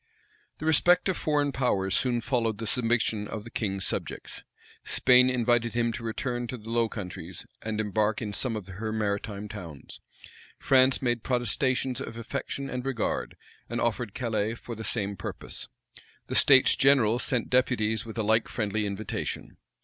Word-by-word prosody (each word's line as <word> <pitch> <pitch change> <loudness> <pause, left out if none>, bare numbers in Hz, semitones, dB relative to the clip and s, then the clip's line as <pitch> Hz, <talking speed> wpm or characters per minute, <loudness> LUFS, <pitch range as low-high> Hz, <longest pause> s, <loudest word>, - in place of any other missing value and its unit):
The 155 - -6
respect 175 +4 +4
of 185 - +1
foreign 145 -2 +1
powers 100 -8 +1
soon 120 0 +1
followed 115 -3 0
the 115 - -5
submission 115 -2 +1
of 105 - -5
the 115 - -11
king's 95 -3 -2
subjects. - - -4 0.4
Spain 125 0 +5
invited 120 -2 +1
him 120 -1 +2
to 120 - -6
return 120 +2 -2
to 125 - -5
the 115 0 -9
Low 115 -1 +2
Countries, 90 -4 -7 0.2
and 110 -1 -3
embark 105 0 +1
in 105 -3 -4
some 115 +3 0
of 105 -3 -6
her 105 +4 -4
maritime 105 -1 -2
towns. 85 -10 -9 0.6
France 130 0 +4
made 120 -2 +1
protestations 125 +2 0
of 115 -4 -6
affection 135 +3 -4
and 125 -2 -4
regard, 130 -4 -2 0.3
and 120 - -2
offered 120 -2 -1
Calais 110 -2 -1
for 120 - -8
the 110 0 -6
same 100 -3 -1
purpose. - - -5 0.6
The - - -4
states 135 -2 +6
general 125 -4 +4
sent 125 -3 0
deputies 110 -4 +2
with 115 -1 -9
a 110 - 0
like 110 +2 +3
friendly 105 -1 -1
invitation. 100 +1 -4
115 Hz, 165 wpm, -28 LUFS, 105-125 Hz, 0.6 s, states